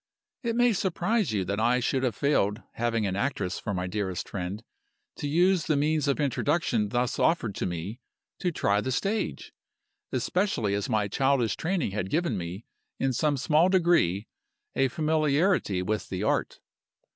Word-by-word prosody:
"It 230 -3 -1
may 245 -1 +4
surprise 195 - 0
you 100 -3 0
that 100 +2 -2
I 120 +3 +3
should 130 +1 0
have 125 -5 0
failed 110 -6 +1
(having 115 -2 0
an 95 -1 -1
actress 100 -5 -1
for 110 - -4
my 90 -2 -2
dearest 95 -1 -3
friend) 100 +3 -5 0.5
to 145 - -3
use 175 +3 +3
the 155 - +1
means 150 +1 +1
of 140 - +1
introduction 140 -5 +1
thus 125 +2 -1
offered 125 - +2
to - - -1
me 90 +7 -5 0.4
to 180 - 0
try 105 -9 +1
the 130 - -2
stage 200 - -2 0.6
especially 180 - 0
as 100 0 -1
my 105 -2 +1
childish 135 +1 +1
training 175 - -1
had 95 -2 -3
given 160 - 0
me, 90 +4 -5 0.3
in 135 -1 +1
some 145 +3 +1
small 155 +6 +3
degree, 170 - +3 0.5
a 135 - +3
familiarity 155 - +1
with 105 +3 -2
the 95 +1 -3
Art. - - 0
125 Hz, 165 wpm, -27 LUFS, 100-160 Hz, 0.6 s, may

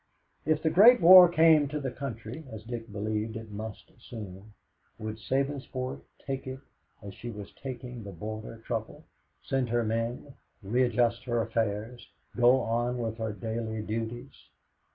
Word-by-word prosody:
If 155 -1 +2
the 160 - +2
Great 225 +9 +8
War 180 0 +10
came 160 -3 +5
to 150 +2 -3
the 135 -3 -3
country, 120 +1 -6
as 110 -1 -8
Dick 115 -1 -7
believed 105 +2 -2
it 110 -1 -9
must 110 +1 -8
soon, 105 -3 -10 0.4
would 110 0 -5
Sabinsport 130 +2 -2 0.2
take 135 -1 -4
it 130 0 -5 0.5
as 100 -1 -8
she 120 - -8
was 105 -3 -8
taking 125 -2 -7
the 100 - -8
Border 110 +5 -7
Trouble 120 +7 -4 0.4
send 135 -3 -1
her 120 0 +1
men, 115 +5 -3 0.3
readjust 120 +2 +1
her 120 -2 0
affairs, 115 +1 -2 0.3
go 125 +2 +5
on 120 +2 -1
with 115 -1 -3
her 110 -1 -2
daily 110 +1 -4
duties? 115 +4 -5
115 Hz, 150 wpm, -29 LUFS, 110-130 Hz, 0.5 s, War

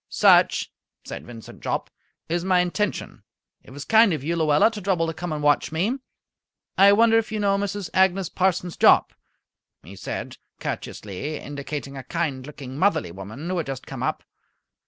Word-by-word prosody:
"Such," - - +4 0.3
said - - -8
Vincent 115 -2 -11
Jopp, - - -3 0.4
"is 170 +1 -1
my 185 -1 +3
intention. 185 +3 -2 0.4
It - - -16
was 140 +2 -8
kind 220 -3 +5
of 150 -4 -4
you, 165 +3 -1
Luella, 155 +5 +4
to 210 -2 -7
trouble 180 -4 +1
to 165 - -3
come 175 +1 -5
and 150 -1 -3
watch 145 +1 +2
me. 200 - -1 0.8
I 195 +1 +7
wonder 225 +2 +5
if 220 - -5
you 215 - -2
know 200 -1 +2
Mrs. 200 -1 -3
Agnes 190 -1 +3
Parsons 180 -1 -1
Jopp?" - - +5 0.7
he 95 +4 -11
said, 95 - -6 0.2
courteously, 110 +10 -5
indicating 140 0 -6
a 135 - -7
kind 140 -3 -3
looking, 135 -2 -8
motherly 185 - +1
woman 105 - -8
who 185 0 -1
had 165 - -2
just 135 -2 -5
come - - -7
up. - - -2
165 Hz, 175 wpm, -24 LUFS, 140-195 Hz, 0.8 s, I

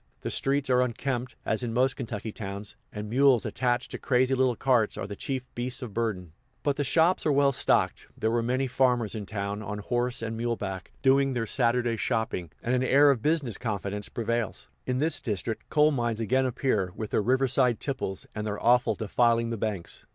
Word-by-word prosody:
The - - -3
streets 140 0 0
are 125 0 +5
unkempt, 125 0 -2
as 110 - 0
in 115 -2 -3
most 130 +2 +2
Kentucky 110 -4 -5
towns, 100 -1 -6 0.2
and 105 0 -6
mules 125 -1 +4
attached 125 0 -1
to - - -5
crazy 130 0 +2
little 130 -2 +2
carts 120 -4 +2
are - - -3
the 100 +1 -6
chief 130 +3 -3
beasts 125 +2 -3
of 115 -5 -7
burden; 100 -7 -2 0.3
but 145 -1 +1
the 145 - -1
shops 165 +7 +3
are 155 - +2
well 140 0 +4
stocked; - - +1
there 110 - 0
were 120 0 +2
many 130 +3 0
farmers 125 -4 +1
in 105 -3 -5
town, 100 -1 -3
on 105 0 -5
horse 120 +3 -2
and 115 0 -3
mule 115 +1 -1
back, 95 -3 -6
doing 135 0 +4
their 120 -2 -1
Saturday 120 0 +1
shopping; 110 -7 -1
and 120 - 0
an 125 - +2
air 140 +2 +6
of 125 -5 -1
business 145 - 0
confidence 105 -2 -3
prevails. 115 -1 -2 0.2
In 125 0 0
this 155 +5 +2
district, 110 -1 -3
coal 150 0 +4
mines 120 -5 -1
again 130 +4 +2
appear, 110 -7 0
with 110 -1 -5
their - - +2
riverside 125 0 +2
tipples, 125 -9 -3
and 105 0 -4
their 105 -1 -3
offal 125 +2 +4
defiling 115 +1 +1
the - - -1
banks. 100 -5 -4
120 Hz, 200 wpm, -27 LUFS, 110-130 Hz, 0.3 s, air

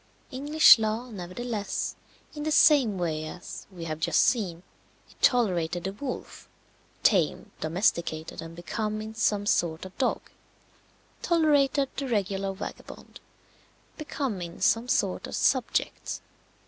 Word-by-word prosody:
English 290 0 +6
law, 220 +3 -2
nevertheless, 205 +3 -4 0.4
in 295 - -7
the 310 - -1
same 275 -10 +5
way 160 -3 -2
as 175 +3 -8
(we 175 -3 -8
have 155 -1 -4
just 160 - +2
seen) 185 -8 0 0.4
it - - -23
tolerated 180 -8 +2
the 190 +1 -3
wolf, 255 +5 -7 0.5
tamed, 180 -8 +2
domesticated, 160 -2 -1
and 165 0 -9
become 210 +5 -3
in 215 +1 -6
some 210 -2 +1
sort 170 -4 0
a - - -7
dog, 255 - -1 0.9
tolerated 290 -4 +3
the 275 - -2
regular 195 -4 -1
vagabond, 190 +1 -9 0.8
become 275 - -4
in 170 0 -7
some 230 +2 +2
sort - - 0
a - - -9
subject. - - 0
205 Hz, 125 wpm, -27 LUFS, 175-250 Hz, 0.9 s, English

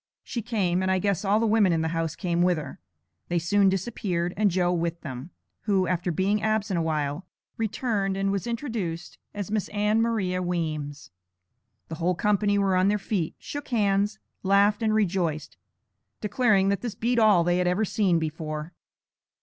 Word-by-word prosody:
She 235 - -4
came, 195 -6 0
and 190 - 0
I 190 - +3
guess 200 -1 0
all 205 +2 +3
the 230 - +1
women 215 -4 +4
in 165 -1 +1
the 160 - 0
house 165 -1 -2
came 175 -3 -1
with 180 -1 +3
her. 145 -4 -7 0.5
They 175 - 0
soon 195 +4 +3
disappeared, 185 -3 -2
and 210 0 +3
Joe 180 -1 +1
with 170 -1 -2
them, 130 +1 -7 0.4
who, 195 -3 +2
after 175 0 -1
being 195 +5 +1
absent 215 -4 0
a - - +1
while, 155 +1 -2 0.3
returned, 210 -3 -1
and 195 0 0
was 200 +2 -2
introduced 220 - -4 0.2
as 205 -1 -4
Miss 215 -2 0
Ann 210 +2 +1
Maria 195 -6 0
Weems. 155 - -3 0.8
The 160 - -6
whole 180 +2 +2
company 205 +2 +2
were 195 -2 +2
on 185 +1 +3
their 210 +1 +2
feet, 195 -5 -2
shook 290 -1 -7
hands, 205 -2 +1 0.2
laughed, 200 +2 +3
and 220 -1 +2
rejoiced, 175 -7 -1 0.6
declaring 210 -3 +2
that 200 -1 0
this 240 -4 -4
beat 240 +1 +1
all 210 -6 +5
they 175 +1 +1
had 180 - +1
ever 185 +5 +1
seen 195 -4 +2
before. 155 0 -4
190 Hz, 180 wpm, -26 LUFS, 170-210 Hz, 0.8 s, all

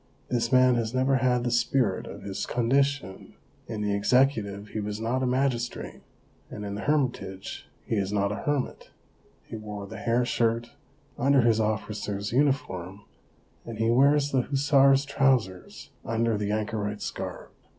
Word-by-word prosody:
This 115 -1 0
man 130 -1 +5
has 115 +1 -2
never 130 +1 +3
had 125 -2 +1
the 120 - -1
spirit 120 -4 +1
of - - -9
his 95 -1 -4
con 120 -1 -1
dition; 140 -8 0 0.3
in 110 -2 -4
the 105 -1 0
executive 105 -2 +1
he 110 - -4
was 105 0 -4
not 120 +4 -1
a 130 - +1
magistrate, 125 -2 -1 0.5
and 105 - -7
in 100 - -4
the 100 - -5
hermitage 120 -9 -2 0.2
he 110 - -1
is 100 -1 -1
not 100 -1 +1
a 105 - -3
hermit; 145 -3 -2 0.6
he - - -7
wore 105 -2 -7
the - - -9
hair 120 +1 +1
shirt 115 -1 0 0.5
under 140 +1 +4
his 115 -2 +3
officer's 105 -1 -2
uniform, 100 -9 0 0.6
and 115 -2 -7
he 115 +1 +2
wears 140 +3 +4
the 130 - +3
hussar's 140 0 +3
trousers 130 -10 0
under 115 0 0
the 105 0 -2
anchorite's 105 -1 -2
garb. - - -7
115 Hz, 160 wpm, -27 LUFS, 105-130 Hz, 0.6 s, man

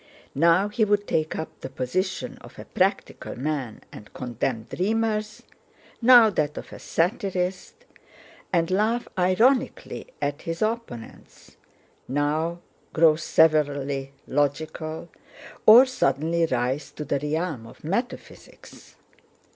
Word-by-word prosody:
Now 170 +6 +4
he 220 +2 0
would 205 -1 +2
take 155 -4 -1
up 160 - -7
the - - -7
position 155 +9 -3
of - - -15
a - - -9
practical - - -1
man 135 -4 -3
and 105 - -12
condemn 120 -1 -3
dreamers; 215 - -2 0.6
now 235 -2 +8
that 150 -5 -1
of - - -8
a - - -9
satirist, 185 - -2 0.7
and 170 -1 +1
laugh 220 +5 +1
ironically 225 - +1
at 145 0 -2
his 165 +4 -3
opponents; 215 - -6 0.5
now 155 +5 -1 0.3
grow 160 -1 +5
severely 145 -4 +1
logical, 155 +3 -2 0.6
or 235 +5 +10
suddenly 170 - 0
rise 130 +1 -1
to 150 - -6
the 140 - -1
realm 150 -4 -3
of - - -16
metaphysics. 200 +11 -6
165 Hz, 115 wpm, -25 LUFS, 145-205 Hz, 0.7 s, or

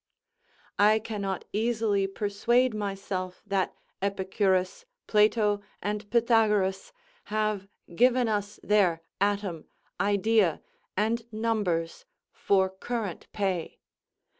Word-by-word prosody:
I 210 +1 +6
cannot 205 -4 -4
easily 215 -2 +1
persuade 220 +5 +1
myself 195 -3 -4
that 195 -2 -1 0.3
Epicurus, 190 - 0 0.2
Plato, 210 -1 +3 0.2
and 205 0 -3
Pytagoras, 220 -5 +2 0.3
have 215 -2 -1 0.3
given 250 +4 +4
us 205 -1 -2
their 185 -6 +2 0.2
atom, 200 -5 -1 0.3
idea 200 -3 +2 0.4
and 225 +3 0
numbers, 215 - -1 0.3
for 190 -1 +2
current 200 0 -5
pay. 190 -5 -2
205 Hz, 90 wpm, -28 LUFS, 190-220 Hz, 0.4 s, I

